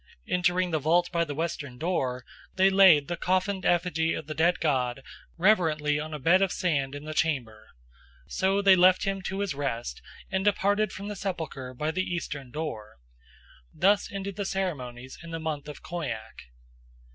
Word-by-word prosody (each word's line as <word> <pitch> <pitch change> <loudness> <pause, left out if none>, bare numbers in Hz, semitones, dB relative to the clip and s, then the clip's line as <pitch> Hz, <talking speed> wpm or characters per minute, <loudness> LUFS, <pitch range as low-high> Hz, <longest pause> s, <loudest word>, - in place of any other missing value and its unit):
Entering 180 0 +1
the 160 - +1
vault 170 +4 +2
by 170 -1 +1
the 145 -3 -5
western 150 -5 -4
door, 130 -7 -2 0.3
they 190 +1 +4
laid 185 -7 +6
the 175 - -2
coffined 185 +2 0
effigy 165 -2 +1
of 155 - -6
the 155 - -5
dead 170 +3 +2
god 130 -4 0 0.3
reverently 160 -6 +2
on 155 +1 -5
a 155 - -4
bed 170 +7 +4
of 195 -2 +2
sand 140 -6 -1
in 145 - -7
the 155 - -5
chamber. 130 -9 -1 0.6
So 195 - 0
they 195 -1 +7
left 185 0 +5
him 195 0 -1
to 190 +2 -3
his 200 -5 -1
rest, 120 - -4 0.3
and 190 0 0
departed 205 0 +2
from 200 +1 -7
the 210 - -4
sepulchre 160 -10 -5
by 150 +5 -1
the 185 +3 -1
eastern 160 -7 -4
door. 120 - -6 0.7
Thus 200 +2 +2
ended 195 0 -5
the 205 - -1
ceremonies 130 -10 -4
in 170 - -10
the 165 0 -4
month 155 -2 -4
of 150 - -9
Khoiak. 120 - -6
165 Hz, 175 wpm, -27 LUFS, 145-185 Hz, 0.7 s, they